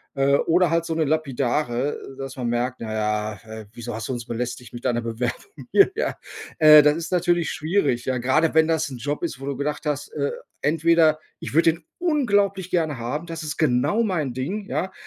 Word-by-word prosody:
Äh, 140 +1 +3
oder 175 0 +2
halt 165 0 +2
so 165 - -2
'ne 160 -1 +1
lapidare, 140 -3 0 0.2
äh, - - -17
dass 135 0 -6
man 125 -2 -3
merkt: 120 +2 -1
„Na 110 -1 -5
ja, 105 0 -1
äh, 110 -1 -9
wieso 115 -2 -6
hast 115 +2 -5
du - - -1
uns 120 -1 -5
belästigt 120 +1 -5
mit 120 - -8
deiner 120 -1 +1
Bewerbung 120 - -5
hier“, 395 -1 +6
ja? 480 - -1 0.4
Äh, 155 -1 +9
das 150 +1 +4
ist 165 +1 -5
natürlich 175 -1 +1
schwierig, 155 -7 0
ja. 130 -1 0
Gerade 145 +7 +2
wenn 160 0 +5
das 160 -2 0
'n 130 - -7
Job 145 +7 -3
ist, 140 -6 -3
wo 135 - -7
du 140 -1 -3
gedacht 150 +3 -3
hast, 145 0 -2
äh, 140 -1 -1 0.3
entweder: 160 0 +3 0.2
„Ich - - -7
würde 165 0 +4
den 165 -1 -15
unglaublich 205 - +1
gerne 160 -5 0
haben, 125 +8 -4
das 165 -1 -6
ist 150 -1 -4
genau 155 - +2
mein 155 - -1
Ding“, 185 - -4
ja? 190 -1 -2
150 Hz, 210 wpm, -23 LUFS, 125-165 Hz, 0.4 s, Äh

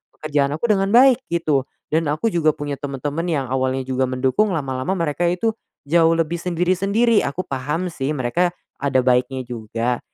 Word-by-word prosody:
pekerjaan 145 -2 0
aku 160 - -3
dengan 195 -1 +2
baik, 250 +2 +6
gitu. 155 -5 +1 0.3
Dan 160 +1 +1
aku 155 +10 0
juga 160 -4 +3
punya 145 -1 -4
teman-teman 145 +3 -3
yang 150 -6 0
awalnya 130 0 0
juga 130 0 -1
mendukung, 130 +11 +1
lama-lama 135 +2 -2
mereka 170 0 0
itu 180 +6 +1 0.4
jauh 165 +1 +4
lebih 165 +1 0
sendiri-sendiri. 185 +6 +2
Aku 175 +7 -3
paham 150 +6 -3
sih 135 -2 -3
mereka 150 +8 +1 0.3
ada 140 -2 +1
baiknya 130 +1 +1
juga, 115 +1 -2
150 Hz, 160 wpm, -21 LUFS, 130-175 Hz, 0.4 s, baik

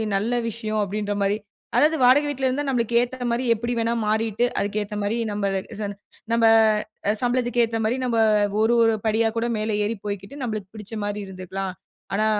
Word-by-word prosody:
நல்ல 220 +5 0 0.2
விஷயம் 215 -1 -2
அப்டின்ற 205 +1 -2
மாரி. 200 +1 +2 0.4
அதாவது, 310 +2 +4
வாடகை 280 +4 +6
வீட்ல 265 -2 -2
இருந்தா 275 +3 0
நமக்கு 235 -2 0
ஏத்தா 245 0 -3
மாரி 245 +2 0
எப்டிவேணா 230 0 -1
மாறிட்டு, 220 +2 +1
அதுக்கு 205 +1 -1
ஏத்தா 210 +1 -6
மாரி 210 +3 0 0.2
நம்ம 205 -1 -2 0.4
சம் 205 -1 -3 0.4
நம்ம 230 0 +2 0.8
சம்பளத்துக்கு 245 -1 +1
ஏத்தா 225 0 -1
மாரி, 235 +3 +1
நம்ம 235 -2 0 0.4
ஒரு 225 +2 +3
ஒரு 225 0 +4
படி 220 +1 +2 0.2
கூட 235 +1 0
மேலே 215 0 -1
ஏறி 225 +2 -1
போயிகிட்டு 200 +5 -5
நம்ளுக்கு 215 -5 -3
பிடிச்ச 210 +1 -9
மாரி 205 0 -2
இருந்துகலாம். 190 0 -5 0.4
ஆனா, 215 +2 +2
225 Hz, 170 wpm, -24 LUFS, 205-240 Hz, 0.8 s, வாடகை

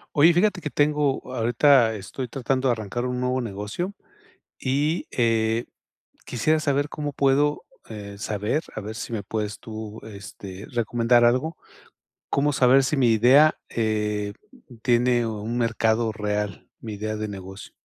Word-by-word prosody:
Oye, 155 +4 +7
fíjate 180 +2 +2
que 150 - -3
tengo 145 -3 0
ahorita 120 0 +4
estoy 115 +6 -6
tratando 130 +2 -1
de 125 - +4
arrancar 115 +2 -4
un 125 0 -2
nuevo 125 +1 0
negocio. 110 - -4 0.7
Y, 145 +5 0
eh, 115 -1 +1 0.6
quisiera 155 +7 +1
saber 145 -1 0
cómo 145 0 -4
puedo, 140 +2 +2 0.3
eh, 100 -2 -8
saber, 105 +8 -1
a - - -4
ver 110 +1 -6
si 115 - -6
me 110 -3 -2
puedes 105 0 -4
tú, 110 -1 -8
este, 100 -2 -9
recomendar 120 0 +2
algo. 130 +7 +1 0.7
¿Cómo 145 +1 +2
saber 135 0 +5
si 140 +3 0
mi 125 -3 +4
idea, 130 +8 +5
eh, 105 -2 -1 0.5
tiene 120 0 +2
un 110 +1 -4
mercado 115 -1 +1
real? 105 -1 -3
Mi 110 -2 -7
idea 110 +1 -3
de 110 0 -3
negocio. 95 -1 -9
120 Hz, 145 wpm, -24 LUFS, 110-135 Hz, 0.7 s, Oye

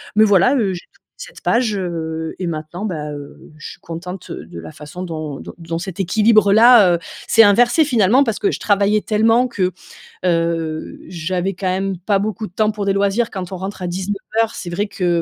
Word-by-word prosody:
Mais 215 - +6
voilà, 205 +5 +4
heu, 210 -8 +1
j'ai 175 - -5
tourné - - -38 0.2
cette - - -11
page, 235 -3 +1
heu, 160 -3 -4
et 185 - -2
maintenant, 160 +3 -5
bah, 155 -7 -4
heu, 145 -1 -11
je - - -8
suis - - -18
contente 180 +2 -8
de 85 +2 -8
la 80 -1 -9
façon 150 +5 -9
dont 155 -5 -5
dont - - -9
dont 165 0 -4
cet 190 +1 -7
équilibre-là, 215 +1 +5
heu, - - -3 0.3
s'est 225 - +6
inversé, 240 +9 +4
finalement, 245 -1 +4
parce 225 -5 -2
que 205 - +1
je - - -4
travaillais 205 +1 +2
tellement 225 +4 +2
que, 185 -6 -1 0.5
heu, 165 -2 -1
j'avais 180 +2 -2
quand 185 +1 -6
même 190 +1 -1
pas 195 +3 0
beaucoup 215 +2 -3
de 180 - -11
temps 215 +2 +1
pour 210 -1 -4
des 195 - +2
loisirs. 200 +4 +1
Quand 185 -2 -6
on 190 - -4
rentre 190 +1 -6
à 180 - -2
19:00, 205 +5 -2
c'est 175 - -6
vrai 175 +4 -1
que 175 -4 0
190 Hz, 205 wpm, -19 LUFS, 170-215 Hz, 0.5 s, Mais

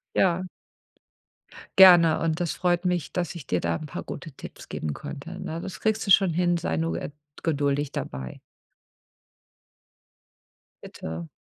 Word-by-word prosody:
Ja. 185 0 +2 1.3
Gerne 175 -4 +8
und 160 -1 0
es 175 -2 -1
freut 175 0 0
mich, 180 -4 0
dass 175 -1 -3
ich 150 -7 -9
dir 90 - +1
da 85 0 -1
'n 155 - -6
paar 150 - -6
gute 155 +2 -8
Tipps - - -11
geben 75 -2 -3
konnte, - - -8
ne? 165 +1 -4
Das 190 - -7
kriegst 220 -1 0
du - - +2
schon 190 -2 +6
hin, 175 +1 +2
sei 80 - -2
nur, 80 +1 -1
äh, - - -4 0.3
geduldig 145 -2 0
dabei. 65 -1 -6 2.4
Bitte. 80 +1 -7
165 Hz, 145 wpm, -26 LUFS, 130-180 Hz, 2.4 s, Gerne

